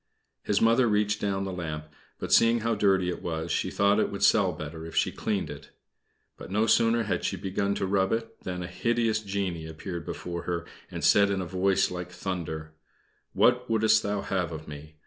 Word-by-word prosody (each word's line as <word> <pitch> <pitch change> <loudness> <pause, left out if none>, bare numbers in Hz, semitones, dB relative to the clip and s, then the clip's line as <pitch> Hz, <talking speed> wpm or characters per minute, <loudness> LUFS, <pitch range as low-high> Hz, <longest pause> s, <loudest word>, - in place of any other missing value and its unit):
His 100 - +1
Mother 115 +2 +4
reached 105 0 +1
down 95 -1 -1
the 95 -1 -4
lamp; 80 -4 -4 0.3
but - - -2
seeing 115 0 +5
how 115 +1 +1
dirty 95 -3 +2
it 90 - -4
was, 80 -1 -3
she - - 0
thought 100 +1 +3
it - - +1
would 100 - -4
sell 100 -4 +5
better 80 0 -7
if 80 - -8
she - - +2
cleaned - - -2
it. - - -10 0.7
But - - -10
no 105 +3 +2
sooner 115 +1 +3
had 105 - -2
she - - -1
begun 100 +1 -1
to - - -1
rub 95 0 +1
it 115 0 -3
than 90 -1 -4
a - - -5
hideous 115 +3 0
genie 95 -6 -3
appeared 85 +2 -6
before 85 -1 -5
her, 85 -1 -2 0.2
and - - -6
said 100 -1 +5
in 100 -1 0
a 95 - -3
voice 95 +2 +1
like 90 -1 -5
thunder: 80 -4 -5 0.6
"What 125 0 +3
wouldst 110 0 +4
thou 105 -1 -2
have 90 -4 -2
of 80 -1 -7
me? 75 +1 -10
95 Hz, 205 wpm, -27 LUFS, 85-105 Hz, 0.7 s, seeing